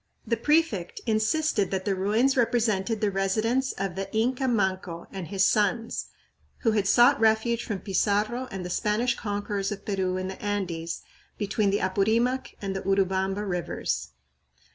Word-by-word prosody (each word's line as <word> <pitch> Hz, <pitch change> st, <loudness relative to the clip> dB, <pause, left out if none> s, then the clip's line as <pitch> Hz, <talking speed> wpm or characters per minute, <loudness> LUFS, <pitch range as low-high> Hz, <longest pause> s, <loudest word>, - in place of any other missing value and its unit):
The 230 Hz, -, +1 dB
prefect 255 Hz, -, +1 dB
insisted 220 Hz, -, +1 dB
that 190 Hz, -1 st, -2 dB
the 200 Hz, -, +1 dB
ruins 215 Hz, +8 st, +2 dB
represented 225 Hz, -3 st, +1 dB
the 210 Hz, -2 st, +2 dB
residence 215 Hz, +7 st, +1 dB
of 195 Hz, -2 st, -3 dB
the 195 Hz, 0 st, -4 dB
Inca 250 Hz, +4 st, +1 dB
Manco 190 Hz, -6 st, -1 dB
and 190 Hz, -4 st, -6 dB
his 190 Hz, +2 st, +2 dB
sons, 215 Hz, +3 st, +1 dB, 0.5 s
who 225 Hz, -, +3 dB
had 205 Hz, -2 st, +1 dB
sought 245 Hz, +6 st, +6 dB
refuge 225 Hz, +1 st, +2 dB
from 205 Hz, -5 st, -4 dB
Pizarro 210 Hz, +6 st, 0 dB
and 190 Hz, -4 st, -5 dB
the 180 Hz, -, -4 dB
Spanish 215 Hz, +6 st, +1 dB
conquerors 205 Hz, -1 st, -3 dB
of 205 Hz, -, -6 dB
Peru 190 Hz, -2 st, -1 dB
in 185 Hz, 0 st, -3 dB
the 190 Hz, -, -7 dB
Andes 175 Hz, -5 st, -3 dB, 0.3 s
between 205 Hz, 0 st, 0 dB
the 200 Hz, -, +1 dB
Apurimac 220 Hz, +7 st, +1 dB
and 195 Hz, -1 st, -2 dB
Urubamba 195 Hz, +1 st, 0 dB
rivers. 180 Hz, -, -2 dB
205 Hz, 150 wpm, -27 LUFS, 190-230 Hz, 0.5 s, sought